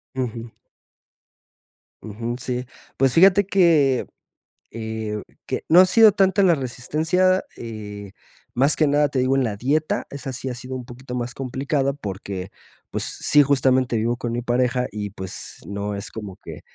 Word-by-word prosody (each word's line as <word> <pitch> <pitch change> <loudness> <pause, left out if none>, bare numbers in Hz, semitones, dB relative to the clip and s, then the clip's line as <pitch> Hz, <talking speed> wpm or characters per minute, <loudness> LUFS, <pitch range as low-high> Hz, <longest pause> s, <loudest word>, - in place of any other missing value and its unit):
Ujú. 120 -2 -4 1.5
Ujú, 115 +3 -5
sí, 125 0 -3 0.3
pues 135 -2 +2
fíjate 195 +4 +6
que, 165 -9 +3 0.6
eh, 110 -1 -4 0.2
que, - - -3
no 175 +3 +8
ha - - +7
sido 220 +2 +6
tanta 195 0 +3
la 175 -3 +5
resistencia, 160 +8 0
eh, 105 -3 -8 0.4
más 135 +5 +2
que 155 - +3
nada 145 +1 +3
te 135 - -1
digo 130 +1 +2
en 135 - +2
la 110 -4 -2
dieta. 150 +7 0
Esa 140 -1 -6
sí 130 +1 -5
ha 130 - -2
sido 125 +2 -7
un 125 -1 -6
poquito 125 0 -8
más 120 0 -3
complicada, 135 +2 -1
porque 100 -7 -6 0.4
pues - - -2
sí, 150 - +3
justamente 130 -3 +2
vivo 115 +2 0
con 120 -1 -4
mi 120 +1 -2
pareja 125 +1 +1
y 105 0 -4
pues 95 -1 -8
no 100 0 -3
es 100 - -7
como 105 -4 -8
que, - - -10
125 Hz, 160 wpm, -22 LUFS, 115-145 Hz, 1.5 s, no